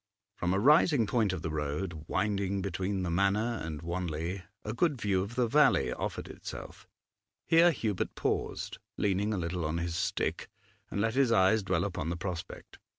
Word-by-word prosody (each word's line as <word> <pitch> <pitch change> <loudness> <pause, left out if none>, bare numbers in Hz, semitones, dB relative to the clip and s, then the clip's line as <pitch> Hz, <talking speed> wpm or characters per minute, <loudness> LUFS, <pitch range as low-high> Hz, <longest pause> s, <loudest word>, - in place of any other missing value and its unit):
From 90 -3 -1
a - - +2
rising 145 - +5
point 110 -2 +1
of 95 -3 -4
the 80 - -2
road, 75 +2 -3
winding 100 -1 0
between 95 0 -2
the 85 - -2
Manor 100 +6 +1
and 80 -1 -5
Wanley, 85 +1 -3 0.2
a 110 - -2
good 145 +1 +1
view 100 -4 +1
of 100 +5 -5
the 125 -1 +3
valley 150 +6 +4
offered - - -4
itself; - - -9 0.6
here 165 +1 +6
Hubert 110 - -2
paused, - - -2 0.2
leaning 100 +1 +1
a 105 - 0
little 85 0 -2
on 80 +2 -1
his 85 0 -2
stick, 90 - -1 0.4
and 100 - -2
let 110 +1 +1
his 130 -2 +3
eyes 110 0 +4
dwell 95 -1 0
upon 90 -5 -3
the 85 - -2
prospect. 90 -1 -6
95 Hz, 175 wpm, -30 LUFS, 85-110 Hz, 0.6 s, here